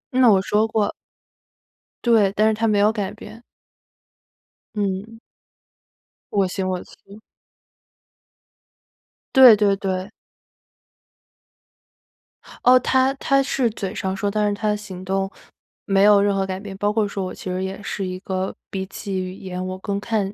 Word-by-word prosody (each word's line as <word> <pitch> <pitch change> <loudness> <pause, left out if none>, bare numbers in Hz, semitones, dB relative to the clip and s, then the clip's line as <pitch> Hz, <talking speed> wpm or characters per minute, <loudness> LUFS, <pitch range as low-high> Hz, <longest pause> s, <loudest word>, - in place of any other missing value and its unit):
那 255 -2 +6
我 195 - +5
说 215 +2 +1
过 215 -2 0 1.1
对， 215 -5 +4
但 215 +1 +3
是 - - +1
他 225 +1 0
没 210 - +2
有 210 +1 +4
改 205 -3 -3
变。 215 +2 -12 1.3
嗯。 205 +2 -3 1.1
我 200 -2 +2
行 185 +1 -3
我 185 -1 -2
素。 200 +2 -16 2.1
对 255 -5 +9
对 205 -1 +2
对。 190 0 -3 2.5
哦， 255 +1 +7
他 260 +2 +2
他 275 0 +2
是 265 -2 0
嘴 195 -3 -5
上 190 0 -2
说， 200 +1 -1
但 210 0 0
是 205 - 0
他 215 +1 -2
的 210 - +1
行 190 -3 -9
动 195 +1 -1 0.6
没 195 0 +3
有 205 -1 +6
任 200 0 +2
何 195 0 0
改 190 0 -4
变。 200 -1 -8
包 205 +1 0
括 210 -1 +1
说 200 -1 -4
我 185 - -6
其 185 - -8
实 185 +1 -2
也 190 +2 -5
是 195 -1 -4
一 185 0 -5
个 190 0 -3 0.2
比 190 -1 -4
起 195 -1 -5
语 185 0 -4
言 185 -1 -6
我 185 0 -5
更 200 0 -3
看 205 -2 -2
200 Hz, 165 characters per minute, -22 LUFS, 190-215 Hz, 2.5 s, 对